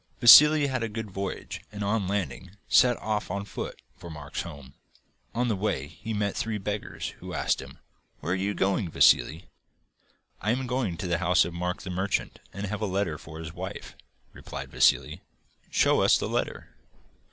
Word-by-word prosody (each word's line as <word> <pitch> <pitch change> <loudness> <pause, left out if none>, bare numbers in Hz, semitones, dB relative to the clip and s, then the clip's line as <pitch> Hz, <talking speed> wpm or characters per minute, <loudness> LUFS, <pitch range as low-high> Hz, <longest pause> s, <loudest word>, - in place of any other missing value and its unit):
Vassili 150 +5 +9
had 130 -3 -1
a 115 - -2
good 110 -1 -6
voyage, 95 0 -5
and 105 0 -5
on 100 -1 0
landing 95 -1 -4
set 120 -1 +5
off 105 -1 -2
on 100 +2 -3
foot - - -6 0.2
for 85 -2 -10
Mark's 75 -2 -6
home. 70 -6 -10 0.6
On 125 +1 +1
the 110 - +1
way 100 -8 -1
he 110 +8 -8
met 105 -2 -1
three 110 -1 -2
beggars, 105 +1 -4
who - - -7
asked - - 0
him: - - -12 0.4
'Where 85 - -2
are - - +1
you 100 +2 -1
going, 95 -1 0
Vassili?' 80 +3 +4 1.0
'I 105 - +1
am 130 +1 -2
going 125 -9 -1
to - - -5
the 85 -1 0
house 90 0 +3
of 85 - -6
Mark 90 +1 -3
the 95 - -5
Merchant, 95 +3 -2
and 100 +2 -5
have 105 +2 -4
a 105 - 0
letter 95 -5 -1
for 80 - -10
his 80 -1 -7
wife,' - - -7 0.4
replied - - -8
Vassili. - - +2 0.5
'Show - - +3
us - - +5
the - - -3
letter. - - -3
100 Hz, 185 wpm, -27 LUFS, 90-110 Hz, 1.0 s, Vassili